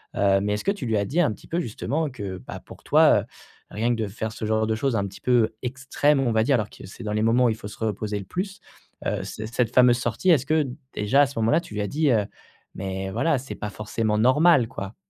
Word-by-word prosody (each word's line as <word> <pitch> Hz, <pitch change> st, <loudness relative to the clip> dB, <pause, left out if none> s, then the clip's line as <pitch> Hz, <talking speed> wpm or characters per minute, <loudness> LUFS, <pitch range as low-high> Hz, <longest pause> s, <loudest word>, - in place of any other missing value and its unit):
Heu, 95 Hz, -1 st, +3 dB
mais 105 Hz, +1 st, 0 dB
est-ce 105 Hz, -, -6 dB
que 195 Hz, -, +3 dB
tu 200 Hz, -9 st, -5 dB
lui 110 Hz, -1 st, +1 dB
as 100 Hz, -, 0 dB
dit 160 Hz, -, +1 dB
un 150 Hz, -, +2 dB
petit -, -, -16 dB
peu, 170 Hz, -, -1 dB
justement, 145 Hz, +6 st, -2 dB
que, 100 Hz, -7 st, -6 dB
bah, -, -, -8 dB
pour -, -, -13 dB
toi, -, -, +5 dB
heu, -, -, -10 dB, 0.5 s
rien 110 Hz, +3 st, -1 dB
que 115 Hz, -, -3 dB
de -, -, -2 dB
faire 110 Hz, +2 st, -5 dB
ce -, -, -8 dB
genre 110 Hz, 0 st, +1 dB
de 110 Hz, -, 0 dB
chose 130 Hz, +2 st, 0 dB
un 100 Hz, -1 st, -1 dB
petit 95 Hz, -, -12 dB
peu 120 Hz, -3 st, +3 dB
extrême, 135 Hz, +3 st, +1 dB
on 125 Hz, -3 st, +1 dB
va 110 Hz, 0 st, +3 dB
dire 135 Hz, +4 st, +3 dB
alors 110 Hz, -4 st, -1 dB
que -, -, -12 dB
c'est 100 Hz, -, -11 dB
dans 105 Hz, -1 st, -3 dB
les 105 Hz, -, 0 dB
moments 120 Hz, +3 st, +3 dB
où -, -, +4 dB
il 110 Hz, -, 0 dB
faut 105 Hz, -, -8 dB
se 105 Hz, -, -12 dB
reposer 105 Hz, -1 st, -2 dB
le 100 Hz, -, -8 dB
plus, 190 Hz, -, -4 dB, 0.5 s
heu, -, -, -1 dB
cette 110 Hz, +2 st, -7 dB
cette 125 Hz, -2 st, +1 dB
fameuse 125 Hz, -1 st, +6 dB
sortie, 125 Hz, +9 st, -1 dB
est-ce 140 Hz, -5 st, +3 dB
que, 155 Hz, -1 st, +1 dB, 0.3 s
déjà, 105 Hz, +7 st, +3 dB
à -, -, +2 dB
ce 135 Hz, -4 st, -6 dB
moment-là, 115 Hz, +9 st, +3 dB
tu 165 Hz, -, -12 dB
lui -, -, -2 dB
as 105 Hz, -, -1 dB
dit, 150 Hz, +4 st, +1 dB
heu, 110 Hz, -4 st, +2 dB, 0.5 s
mais 95 Hz, 0 st, -4 dB
voilà,: 155 Hz, +8 st, +1 dB
«C'est 135 Hz, -, -8 dB
pas 105 Hz, -, -5 dB
forcément 105 Hz, +1 st, -2 dB
normal», 130 Hz, +3 st, +5 dB
quoi? 100 Hz, 0 st, -7 dB
115 Hz, 270 wpm, -24 LUFS, 105-135 Hz, 0.5 s, fameuse